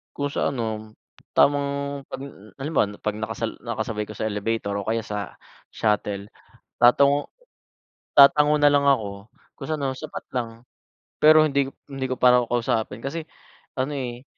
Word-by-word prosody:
Kung 145 0 -2
sa - - +1
ano, 110 -4 -4 0.4
tamang 140 0 +2
'pag - - -6 0.4
halimbawa 140 -6 0
'pag 105 - -2
nakasal 110 +1 -3
nakasabay 110 -2 -3
ko - - -6
sa 110 - -2
elevator 105 0 -2
o 100 -1 -3
kaya 115 0 -1
sa 105 -3 -5 0.3
shuttle, 105 -2 -1 0.5
tatango 140 +4 +4 0.8
tatango 150 +1 +7
nalang 145 -1 +4
ako. 115 -8 +2 0.5
Kung - - -7
sa 155 - +1
ano 135 -2 -2
sapat - - -7
lang. 120 -3 -2 0.7
Pero 155 0 +7
hindi 140 -2 +1 0.2
hindi 135 -1 -3
ko 130 - -2
pa 125 0 +5
raw - - +3
kakausapin. 115 -2 -1
Kasi 155 +4 -4 0.5
ano, 130 +3 -1
eh, 125 -2 -5
125 Hz, 145 wpm, -24 LUFS, 110-140 Hz, 0.8 s, tatango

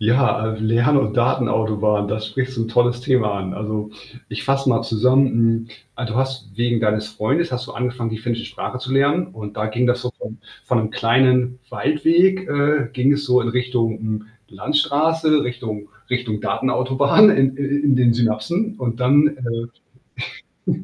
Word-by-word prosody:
Ja, 110 -1 +1
äh, 110 - -7
Lern 115 +6 +2
und 105 -6 0
Datenautobahn, 110 -4 +1
da 105 +1 -1
sprichst 125 +4 -4
du 115 - 0
'n - - -6
tolles 120 +1 +1
Thema 125 -6 +1
an. 95 -1 -5
Also, 105 0 -4 0.4
ich - - -6
fasse 135 0 0
mal 115 -3 +2
zusammen, 125 +4 +3
hm, 115 -1 +1 0.3
also, 120 -4 -4
du 125 - +1
hast 130 -4 -3
wegen 120 -1 0
deines 105 -1 0
Freundes 135 +11 -1
hast 125 0 -4
du - - -8
angefangen, 120 -1 -3
die 110 - -4
finnische 115 +1 -3
Sprache 125 - -6
zu 130 0 -6
lernen 145 +6 +2
und 105 - -9
da 105 0 -2
ging 120 +3 0
das 125 0 +1
so 125 - -4
von 110 +2 -8 0.3
von 125 - +1
'nem 110 -1 -2
kleinen 125 +2 +2
Waldweg 175 +5 +2
äh, 145 -3 +1
ging 135 +2 +2
es 145 0 -2
so 125 -1 +4
in 120 - -2
Richtung, 120 -2 -1
hm, 110 -1 -4 0.2
Landstraße, 150 +6 +1
Richtung 115 -4 -5 0.2
Richtung 125 -4 -2
Datenautobahn 135 +10 +3
in 135 -9 +2
i - - -4
in 140 0 +1
den 125 -2 +4
Synapsen 120 - -1
und 115 - -3
dann, 145 +4 +5 1.5
äh - - -9
125 Hz, 175 wpm, -20 LUFS, 110-135 Hz, 1.5 s, dann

